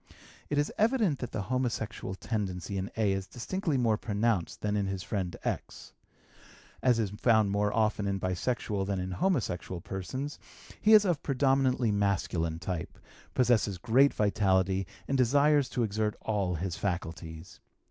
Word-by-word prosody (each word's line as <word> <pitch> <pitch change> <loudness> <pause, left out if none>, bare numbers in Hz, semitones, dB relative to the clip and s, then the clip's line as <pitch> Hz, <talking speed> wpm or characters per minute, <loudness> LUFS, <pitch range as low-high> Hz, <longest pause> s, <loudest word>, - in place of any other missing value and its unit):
It 145 - 0
is 145 0 +1
evident 220 - +2
that 125 - -5
the 105 - -3
homosexual 115 -5 -2
tendency 100 -3 -3
in 95 +1 -2
A. 105 -3 +2
is 95 0 -3
distinctly 165 - -2
more 115 -4 +2
pronounced 105 -4 -1
than 105 0 0
in 100 -1 0
his 95 -1 -3
friend 95 -4 -3
X. - - -4 0.9
As 125 -2 +4
is 110 -4 0
found 110 -1 +3
more 105 0 +1
often 110 -2 +1
in 100 0 -1
bisexual 95 +2 -1
than 100 -2 -1
in 90 +1 -3
homosexual 100 - -1
persons, 130 - -5 0.4
he 215 - +5
is 210 -1 +8
of 175 -6 +1
predominantly 130 -3 +2
masculine 95 -5 0
type, 85 -1 -5 0.4
possesses 115 -6 +2
great 125 +9 +4
vitality, 95 -2 +1 0.2
and 135 -1 0
desires 140 +2 +4
to 125 - -1
exert 105 0 -1
all 100 -5 -1
his 85 +1 -3
faculties. 85 -3 -5
105 Hz, 150 wpm, -30 LUFS, 95-130 Hz, 0.9 s, is